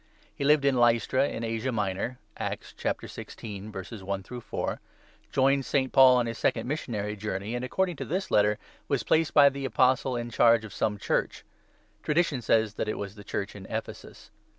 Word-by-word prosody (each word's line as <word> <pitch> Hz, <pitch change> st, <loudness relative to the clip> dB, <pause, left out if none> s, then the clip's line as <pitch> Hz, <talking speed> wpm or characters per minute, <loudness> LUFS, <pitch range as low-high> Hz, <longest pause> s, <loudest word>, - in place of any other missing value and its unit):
He -, -, -5 dB
lived 145 Hz, 0 st, +4 dB
at 140 Hz, -, +4 dB
Lystra 120 Hz, +2 st, +3 dB
in 115 Hz, -, -5 dB
Asia 115 Hz, +3 st, -2 dB
Minor 105 Hz, +2 st, -2 dB, 0.2 s
(Acts -, -, -5 dB
16. 105 Hz, -1 st, -5 dB, 0.4 s
i 100 Hz, -1 st, -2 dB
— 125 Hz, +5 st, -7 dB
4), -, -, -4 dB, 0.5 s
joined 135 Hz, +1 st, +3 dB
St. 130 Hz, -1 st, 0 dB
Paul 130 Hz, -2 st, +8 dB
on 120 Hz, -, +2 dB
his 115 Hz, 0 st, -5 dB
second 115 Hz, 0 st, 0 dB
missionary 110 Hz, -8 st, -3 dB
journey, 100 Hz, +1 st, -4 dB
and, 120 Hz, 0 st, -3 dB
according 180 Hz, +5 st, -1 dB
to -, -, -4 dB
this 185 Hz, +4 st, -3 dB
Letter, 105 Hz, 0 st, +4 dB, 0.3 s
was -, -, 0 dB
placed 160 Hz, -1 st, +2 dB
by 145 Hz, -1 st, +8 dB
the 140 Hz, 0 st, -6 dB
Apostle 130 Hz, +1 st, +2 dB
in 120 Hz, 0 st, -4 dB
charge 115 Hz, -1 st, +4 dB
of 105 Hz, -, -10 dB
some 105 Hz, +1 st, -1 dB
Church. -, -, -1 dB, 0.6 s
Tradition 150 Hz, -4 st, +1 dB
says 110 Hz, -2 st, +2 dB
that 110 Hz, -, -3 dB
it -, -, -2 dB
was 100 Hz, -1 st, -5 dB
the 105 Hz, -1 st, -12 dB
Church 100 Hz, +1 st, -4 dB
in 95 Hz, -2 st, -9 dB
Ephesus. -, -, -7 dB
120 Hz, 180 wpm, -28 LUFS, 105-135 Hz, 0.6 s, Paul